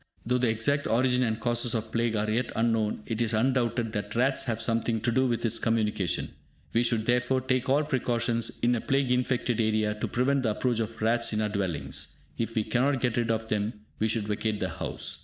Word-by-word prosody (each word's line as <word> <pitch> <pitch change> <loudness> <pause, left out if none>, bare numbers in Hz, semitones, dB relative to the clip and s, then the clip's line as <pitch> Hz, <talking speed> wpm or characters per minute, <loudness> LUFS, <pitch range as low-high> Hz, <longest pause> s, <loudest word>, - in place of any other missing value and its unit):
Though 125 +2 +1
the 125 -2 +2
exact 125 +6 +1
origin 125 +2 +2
and 110 -3 0
causes 120 0 0
of 110 0 -3
plague 115 -1 0
are 105 0 0
yet 115 +3 0
unknown, 115 -2 +1
it 115 0 -2
is 115 -1 +1
undoubted 120 -1 +1
that 105 +1 -4
rats 130 +3 +2
have 115 -3 -1
something 115 0 0
to 120 - +1
do 130 +2 +2
with 120 -1 -1
its 115 0 +1
communication. 105 -5 0 0.4
We 115 - +4
should, 115 -2 +1
therefore, 125 +2 +2
take 130 0 0
all 145 +3 +4
precautions, 120 -5 -1
in 120 +1 +4
a 115 - 0
plague 135 -2 +1
infected 125 -2 +1
area, 110 -1 +1
to 105 - -3
prevent 135 +3 +1
the 120 - +1
approach 115 +2 0
of 115 0 -3
rats 115 0 +2
in 105 - 0
our 105 - 0
dwellings; 85 -10 -3 0.2
if 115 +4 -3
we 110 - +2
cannot 130 +4 +1
get 120 -2 0
rid 120 -1 0
of 110 0 -1
them, 105 +1 0 0.3
we 110 - +2
should 110 -1 0
vacate 105 0 -1
the - - -1
house. - - -5
115 Hz, 215 wpm, -28 LUFS, 110-125 Hz, 0.4 s, We